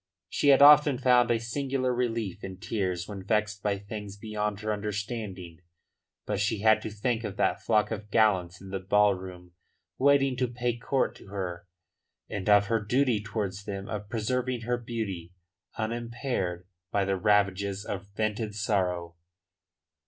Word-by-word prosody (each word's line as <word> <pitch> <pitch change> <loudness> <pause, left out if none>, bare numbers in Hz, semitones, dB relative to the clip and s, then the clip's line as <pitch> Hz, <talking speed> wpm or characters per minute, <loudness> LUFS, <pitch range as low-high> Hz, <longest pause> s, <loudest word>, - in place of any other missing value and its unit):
She - - 0
had 140 0 +7
often 145 -2 +8
found 125 -1 +4
a 115 -1 +2
singular 130 +2 -1
relief 115 -6 -2
in 95 -1 -6
tears 95 -4 -2
when 100 -2 -6
vexed 105 +1 0
by 100 -1 0
things 100 0 -7
beyond 105 -1 -3
her 110 0 -1
understanding. 105 -4 -5 0.7
But 105 -2 -2
she 105 0 0
had 110 0 +5
to - - -4
think 110 +2 -1
of 100 -2 -5
that - - +1
flock 110 0 +2
of 105 -1 -5
gallants 95 -5 +2
in 95 0 -11
the 95 - -2
ballroom 95 -2 +1 0.5
waiting 135 -1 +4
to 125 0 +1
pay 120 0 -2
court 130 +3 0
to - - -15
her 90 -3 -5 0.6
and 100 0 -3
of 105 0 +6
her 115 +2 +1
duty 120 0 +2
towards 100 -2 -4
them 100 -1 -5
of 105 -1 -5
preserving 125 +2 -1
her 120 +1 -1
beauty 100 -8 -5 0.4
unimpaired 115 -5 -3 0.2
by 100 -1 +1
the 95 0 +1
ravages 100 0 +1
of 100 -2 -3
a - - -21
vented 110 -1 -2
sorrow. 90 -5 -1
105 Hz, 160 wpm, -28 LUFS, 95-115 Hz, 0.7 s, often